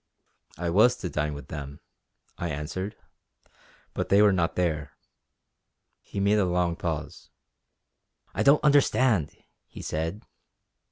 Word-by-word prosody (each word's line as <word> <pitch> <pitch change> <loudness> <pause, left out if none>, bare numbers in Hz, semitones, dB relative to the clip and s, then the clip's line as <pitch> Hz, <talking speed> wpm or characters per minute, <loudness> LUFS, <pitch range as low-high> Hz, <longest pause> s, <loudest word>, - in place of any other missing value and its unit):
"I 85 +1 -2
was 110 +7 +5
to 90 - -5
dine 75 -1 -1
with 70 -3 -10
them;" 70 -1 -7 0.6
I 85 - -4
answered 85 +8 -4 1.0
"but - - -3
they 100 +1 +6
were 105 -2 +5
not 85 -2 0
there." 75 -5 -1 1.1
He - - -6
made 100 +2 +3
a 100 - +3
long 90 -1 0
pause. 80 -3 -5 1.0
"I 100 - -1
don't 140 +6 +5
understand!" 130 - +3 0.4
he - - -10
said. 80 +7 -3
90 Hz, 125 wpm, -27 LUFS, 75-105 Hz, 1.1 s, they